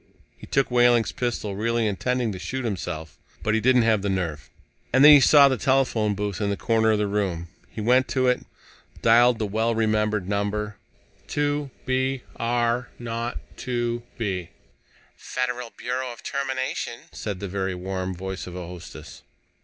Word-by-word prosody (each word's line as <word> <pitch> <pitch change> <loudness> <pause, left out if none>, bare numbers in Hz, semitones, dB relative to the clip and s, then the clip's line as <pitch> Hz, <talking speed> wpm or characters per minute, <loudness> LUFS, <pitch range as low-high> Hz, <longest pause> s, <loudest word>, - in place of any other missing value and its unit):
He - - -13
took 135 -2 +1
Wehling's 120 -2 +4
pistol, 115 -5 -3
really 115 +2 0
intending 120 +3 0
to 95 - -6
shoot 125 +8 -4
himself. 85 -7 -4 0.3
But 110 - +1
he 110 - +3
didn't 125 +1 +4
have 110 -3 +3
the 100 - -1
nerve. 85 -6 -3 0.4
And 130 +3 +6
then 150 - +11
he 145 - +10
saw 140 0 +7
the 130 -2 +1
telephone 120 -6 +2
booth 105 0 -3
in 100 - +1
the 100 - -1
corner 110 -1 +2
of 110 - +3
the 105 - +1
room. 95 -5 -2 0.2
He 110 - -6
went 125 +4 +3
to 130 -1 0
it, 125 0 +2 0.6
dialed 120 +1 +6
the 110 - -1
well 110 +3 0
remembered 105 -3 +1
number: 105 +1 -2 0.5
"2 145 -1 -1 0.2
B 130 0 0
R 120 +1 0
0 115 0 -3 0.2
2 120 -1 -2 0.2
B." 95 -6 -3 0.7
"Federal 125 -1 -3
Bureau 125 +1 -3
of 120 - -12
Termination," 130 -3 -3
said 100 -4 -5
the 100 - -4
very 95 0 -2
warm 95 0 -4
voice 95 +1 -5
of 90 - -8
a 90 -1 -5
hostess. 85 -3 -10
115 Hz, 170 wpm, -25 LUFS, 100-125 Hz, 0.7 s, then